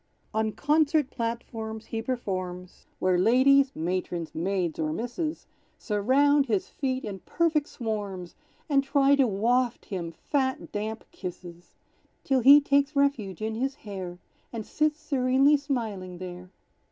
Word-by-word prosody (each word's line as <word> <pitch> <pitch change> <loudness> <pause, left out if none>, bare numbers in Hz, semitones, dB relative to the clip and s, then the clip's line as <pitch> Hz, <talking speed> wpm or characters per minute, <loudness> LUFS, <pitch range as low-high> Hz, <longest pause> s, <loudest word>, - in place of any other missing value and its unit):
On 220 0 0
concert 300 +1 +2
platforms 225 -2 -4
he 225 0 -4
performs, 185 -7 -5
Where 185 -1 +2
ladies, 260 +6 +5
(matrons, 175 0 -3
maids 175 -1 -1
or 155 -1 0
misses), 245 - -3 0.3
Surround 275 +7 +2
his 210 -5 0
feet 260 -1 -2
in 200 -2 -5
perfect 315 - 0
swarms, 205 -6 -5 0.3
And 280 -3 +3
try 275 0 +3
to 270 -2 +3
waft 235 +4 +1
him 175 -5 -4
fat 260 - -2
damp 215 +2 -4
kisses; 175 -1 -9 0.5
Till 270 -1 +2
he 275 +4 +9
takes 280 +1 +1
refuge 230 -9 0
in 220 0 -1
his 265 +4 -2
hair, 190 -8 -7 0.3
And 225 -3 -5
sits 305 0 0
serenely 275 0 +3
smiling 220 -11 -3
there. 180 0 -8
230 Hz, 130 wpm, -27 LUFS, 185-275 Hz, 0.5 s, he